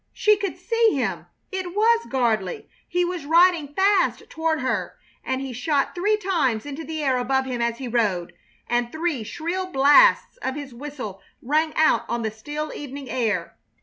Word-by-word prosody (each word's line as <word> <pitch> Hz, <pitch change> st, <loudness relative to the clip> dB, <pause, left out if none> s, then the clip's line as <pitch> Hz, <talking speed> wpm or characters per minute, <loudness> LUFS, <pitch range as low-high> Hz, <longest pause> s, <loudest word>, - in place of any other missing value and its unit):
She 425 Hz, 0 st, +4 dB
could 400 Hz, -2 st, -4 dB
see 460 Hz, -6 st, +2 dB
him. 270 Hz, -, -2 dB, 0.2 s
It 375 Hz, -1 st, -4 dB
was 455 Hz, +2 st, +3 dB
Gardley. 225 Hz, -8 st, 0 dB, 0.2 s
He 355 Hz, 0 st, +1 dB
was 350 Hz, -3 st, -4 dB
riding 330 Hz, -3 st, +4 dB
fast 390 Hz, -1 st, +2 dB
toward 320 Hz, -1 st, 0 dB
her, 260 Hz, -, -2 dB, 0.3 s
and 260 Hz, 0 st, -2 dB
he 270 Hz, -2 st, -5 dB
shot 275 Hz, +4 st, 0 dB
three 415 Hz, +4 st, +1 dB
shots 310 Hz, -, 0 dB
into 290 Hz, +2 st, -6 dB
the 315 Hz, -1 st, -4 dB
air 260 Hz, -3 st, +2 dB
above 265 Hz, +2 st, +1 dB
him 250 Hz, -2 st, -3 dB
as 235 Hz, 0 st, 0 dB
he 260 Hz, -, -5 dB
rode, 210 Hz, -7 st, 0 dB, 0.3 s
and 240 Hz, 0 st, 0 dB
three 315 Hz, -5 st, -1 dB
shrill 345 Hz, -, -3 dB
blasts 330 Hz, -, +5 dB
of 260 Hz, -, -3 dB
his 285 Hz, -3 st, -7 dB
whistle 250 Hz, -7 st, -7 dB, 0.2 s
rang 310 Hz, +4 st, +1 dB
out 315 Hz, -7 st, +3 dB
on 235 Hz, 0 st, -1 dB
the 220 Hz, -, -1 dB
still 295 Hz, +8 st, -5 dB
evening 280 Hz, -1 st, -7 dB
air. 215 Hz, -9 st, -1 dB
290 Hz, 175 wpm, -23 LUFS, 245-350 Hz, 0.3 s, blasts